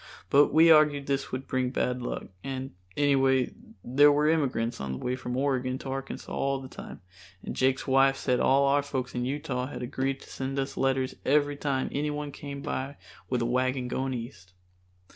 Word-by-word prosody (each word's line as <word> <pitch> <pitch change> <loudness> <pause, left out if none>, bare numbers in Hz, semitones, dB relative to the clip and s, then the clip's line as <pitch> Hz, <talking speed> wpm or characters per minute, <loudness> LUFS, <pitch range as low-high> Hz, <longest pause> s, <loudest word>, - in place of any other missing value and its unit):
But 145 +1 +7
we 165 +2 +7
argued 150 -2 +5
this 140 0 -2
would 130 +1 -4
bring 130 -1 0
bad 125 -1 -1
luck, 120 - -4 0.2
and 135 0 -4 0.3
anyway 135 -3 +3 0.3
there 145 +4 +5
were 150 +1 +2
immigrants 130 - 0
on 70 -1 -3
the - - -4
way 125 - -2
from 125 -1 -4
Oregon 130 -2 0
to 135 - -8
Arkansas 135 0 -5
all 135 0 0
the 130 - -8
time, - - -10 0.4
and - - -5
Jake's 130 0 +1
wife 135 0 +4
said 125 -2 0
all 135 +1 +4
our 140 +1 +3
folks 130 -3 -4
in 125 0 -2
Utah 135 -2 -2
had 130 - -6
agreed 135 +2 -2
to - - -13
send 135 +1 -4
us 135 0 -2
letters 135 -1 0
every 145 +1 +2
time 140 -2 -1
anyone 150 0 -2
came 140 0 -7
by 135 +2 -4 0.3
with 125 -2 0
a 125 +2 +1
team 130 -2 -4
going 130 +1 -2
east. 100 -7 -8
135 Hz, 190 wpm, -28 LUFS, 130-140 Hz, 0.4 s, But